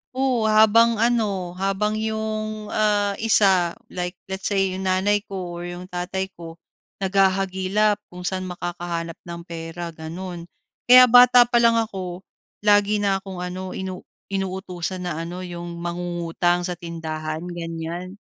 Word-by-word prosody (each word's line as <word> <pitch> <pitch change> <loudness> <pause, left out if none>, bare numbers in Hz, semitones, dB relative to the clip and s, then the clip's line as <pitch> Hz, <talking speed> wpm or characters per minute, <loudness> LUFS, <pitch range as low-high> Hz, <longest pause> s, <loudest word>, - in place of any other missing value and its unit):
Oo, 255 -4 +1
habang 220 +2 +5
ano, 210 -6 0
habang 195 +2 0
yung, 215 -1 -3
ah, 205 -1 +2
isa 190 -6 +3 0.2
like 180 0 -4 0.2
let's 190 +1 -3
say 195 -2 +1
yung 190 0 -4
nanay 195 +3 +2
ko 180 -3 -5
or - - -6
yung 175 +1 -7
tatay 190 +2 -3
ko, 165 -1 -10 0.5
naghahagilap 195 +2 +2
kung 180 0 -10
saan 185 0 -2
makakahanap 175 -2 -4
ng 170 0 -6
pera, 170 0 -6
ganun. 170 +2 -7 0.4
Kaya 255 +1 +10
bata 245 0 +9
pa 240 0 +2
lang 230 0 +5
ako, 190 -5 -3 0.4
lagi 205 0 +4
na 195 -1 +2
akong 190 -2 -7
ano 185 +1 -5
inu 190 -1 -5 0.3
inutusan 185 -1 -3
na 160 -2 -3
ano 175 +2 -5
yung 175 -1 -6
mangungutang 175 0 -1
sa 180 0 -3
tindahan, 160 -2 -5
ganyan. 170 +2 -5
185 Hz, 140 wpm, -23 LUFS, 175-210 Hz, 0.5 s, Kaya